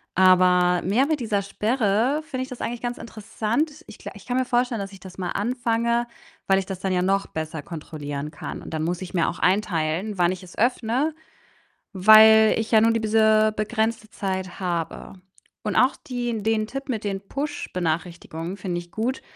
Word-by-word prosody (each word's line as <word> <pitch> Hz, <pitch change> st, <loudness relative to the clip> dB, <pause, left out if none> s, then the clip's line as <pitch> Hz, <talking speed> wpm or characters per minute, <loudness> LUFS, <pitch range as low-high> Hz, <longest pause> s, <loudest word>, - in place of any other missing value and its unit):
Aber 180 Hz, -1 st, +5 dB
mehr 220 Hz, +9 st, +2 dB
mit 305 Hz, 0 st, 0 dB
dieser 215 Hz, -4 st, 0 dB
Sperre 225 Hz, +6 st, +1 dB
finde 275 Hz, -5 st, -5 dB
ich 260 Hz, -, -9 dB
das 250 Hz, -, -8 dB
eigentlich 240 Hz, 0 st, -3 dB
ganz 240 Hz, 0 st, -3 dB
interessant. 235 Hz, +7 st, -3 dB
Ich -, -, -12 dB
gla -, -, -8 dB
ich -, -, -13 dB
kann 250 Hz, +1 st, -1 dB
mir 260 Hz, -, +1 dB
vorstellen, 245 Hz, -3 st, 0 dB
dass 195 Hz, -, -6 dB
ich 190 Hz, -, -12 dB
das 185 Hz, 0 st, -12 dB
mal 180 Hz, -2 st, -2 dB
anfange, 235 Hz, +1 st, 0 dB, 0.4 s
weil 195 Hz, 0 st, +4 dB
ich 190 Hz, -, -4 dB
das 190 Hz, -2 st, -6 dB
dann 190 Hz, -, -2 dB
ja 180 Hz, -, +1 dB
noch 195 Hz, +1 st, +1 dB
besser 160 Hz, 0 st, -5 dB
kontrollieren 150 Hz, -2 st, -6 dB
kann. -, -, -7 dB
Und -, -, -9 dB
dann 155 Hz, -, -2 dB
muss 175 Hz, +2 st, -2 dB
ich 185 Hz, +1 st, -7 dB
mir 170 Hz, -, +2 dB
auch -, -, -6 dB
einteilen, 185 Hz, 0 st, 0 dB
wann 175 Hz, 0 st, +3 dB
ich 185 Hz, -, -6 dB
es 180 Hz, -, -14 dB
öffne, 250 Hz, +5 st, +1 dB, 0.8 s
weil 220 Hz, +2 st, +7 dB
ich 225 Hz, 0 st, -3 dB
ja 220 Hz, -, +7 dB
nur 225 Hz, +1 st, +4 dB
diese 220 Hz, -1 st, +3 dB
begrenzte 220 Hz, 0 st, -1 dB
Zeit 190 Hz, -2 st, -4 dB
habe. 170 Hz, -2 st, -3 dB, 0.5 s
Und 210 Hz, -, -2 dB
auch 255 Hz, +2 st, +4 dB
die 240 Hz, -3 st, -4 dB
den 220 Hz, -1 st, +1 dB
Tipp 275 Hz, +1 st, -6 dB
mit 225 Hz, -4 st, -2 dB
den 195 Hz, -1 st, -2 dB
Push-Benachrichtigungen 175 Hz, -, -4 dB
finde 180 Hz, -2 st, -3 dB
ich 175 Hz, 0 st, -9 dB
gut. 240 Hz, +4 st, -2 dB
210 Hz, 190 wpm, -24 LUFS, 180-235 Hz, 0.8 s, weil